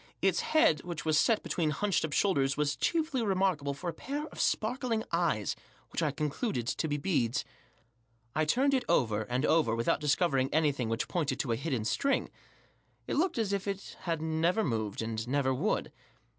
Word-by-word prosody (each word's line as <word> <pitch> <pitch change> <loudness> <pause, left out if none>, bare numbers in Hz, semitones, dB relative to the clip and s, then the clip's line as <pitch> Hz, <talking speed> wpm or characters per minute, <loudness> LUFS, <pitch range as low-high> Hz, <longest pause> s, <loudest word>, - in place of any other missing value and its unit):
Its - - +2
head, 235 - +3
which 170 -3 -6
was 155 -1 +2
set 215 +8 +3
between 165 -3 0
hunched 195 +6 0
up 155 - -2
shoulders* 140 -7 +2
was 145 -1 +1
chiefly 315 -6 0
remarkable 185 -8 +1
for 175 - -7
a 170 - -1
pair 290 +3 -4
of - - -12
sparkling 230 0 0
eyes, 165 - 0 0.4
which - - -2
I 155 - +2
concluded 145 - -2
to 160 - -1
be 145 -1 -1
beads, 140 -7 0 0.9
I 155 - +2
turned 265 - +2
it 260 - +2
over 110 -9 +2
and 125 +4 0
over 155 -8 +3
without 115 0 +1
discovering 145 -3 +2
anything 145 -6 +1
which 115 +1 -1
pointed 150 -7 -1
to 120 - -3
a - - +2
hidden 130 -4 -2
spring* 275 - 0 0.7
It - - -2
looked 345 +1 +1
as 215 -3 0
if 200 0 -2
it 200 0 -4
had 165 -3 -2
never 165 +6 +1
moved, 110 -5 -2
and 110 0 -3
never 130 0 +1
would. 160 +12 -1
155 Hz, 185 wpm, -31 LUFS, 135-195 Hz, 0.9 s, head